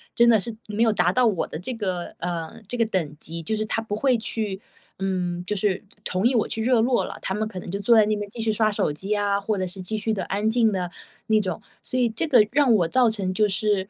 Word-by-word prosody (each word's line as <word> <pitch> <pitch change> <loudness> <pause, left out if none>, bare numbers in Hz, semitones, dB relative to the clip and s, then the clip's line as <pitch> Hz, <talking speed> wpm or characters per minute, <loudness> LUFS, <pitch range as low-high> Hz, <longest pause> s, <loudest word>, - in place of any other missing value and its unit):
真 235 0 +5
的 220 -3 +6
是 220 +3 -4
没 210 +2 -2
有 225 - +4
达 180 -3 +2
到 250 -1 +4
我 195 -6 0
的 155 - -6
这 245 +8 -4
个 185 -5 -3
呃， 175 +5 -4
这 245 - -4
个 230 - +3
等 165 -8 -2
级。 165 +1 -7
就 220 +7 -1
是 215 0 -1
他 225 - -1
不 210 -2 -4
会 255 +1 +2
去 215 -3 -3 0.4
嗯， 180 -2 -2
就 210 - -2
是 195 -1 0 0.2
同 185 +4 -1
意 260 - +1
我 220 - +2
去 220 - -3
热 245 -1 +3
络 245 +1 +2
了， - - -8
他 190 - -2
们 215 0 -1
可 185 -4 -6
能 175 - -8
就 200 +2 -3
坐 235 +3 +5
在 215 - +6
那 215 0 +1
边 205 -1 -5
继 235 - -10
续 220 -1 +1
刷 215 0 +2
手 150 -7 0
机 195 +7 -3
啊， 200 -1 +1
或 210 0 -1
者 185 -1 -1
是 185 +1 -8
继 215 +4 -3
续 220 +1 -1
地 195 - -2
安 205 +3 0
静 225 -2 +3
的 180 -2 -2 0.4
那 220 -1 +4
种。 190 - -4 0.2
所 255 - 0
以 245 - +4
这 225 +9 -2
个 235 -7 +5
让 275 -4 +4
我 175 -6 +3
造 245 +5 +4
成 195 -4 -1
就 210 +1 +2
是 195 +1 0
210 Hz, 295 characters per minute, -24 LUFS, 185-225 Hz, 0.4 s, 的